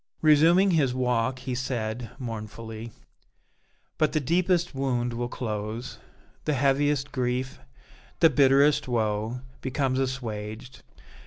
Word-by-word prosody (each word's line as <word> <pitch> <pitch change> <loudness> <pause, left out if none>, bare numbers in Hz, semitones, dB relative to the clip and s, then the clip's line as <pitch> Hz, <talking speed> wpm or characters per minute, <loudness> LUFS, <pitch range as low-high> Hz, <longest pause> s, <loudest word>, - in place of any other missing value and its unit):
Resuming 165 +6 +5
his 140 -7 +2
walk, 125 0 0
he 125 0 -5
said, 120 -2 -3
mournfully: 115 -2 -7 1.1
"But 155 - +2
the 155 - +2
deepest 175 +4 +1
wound 125 -3 -1
will 120 +1 -2
close; 110 0 -5 0.5
the 150 - +1
heaviest 140 +1 +1
grief, 125 0 -2 0.6
the 165 -2 +6
bitterest 140 +1 +4
woe, 110 0 -1 0.2
becomes 130 0 0
assuaged. 120 -2 -4
130 Hz, 105 wpm, -26 LUFS, 115-140 Hz, 1.1 s, the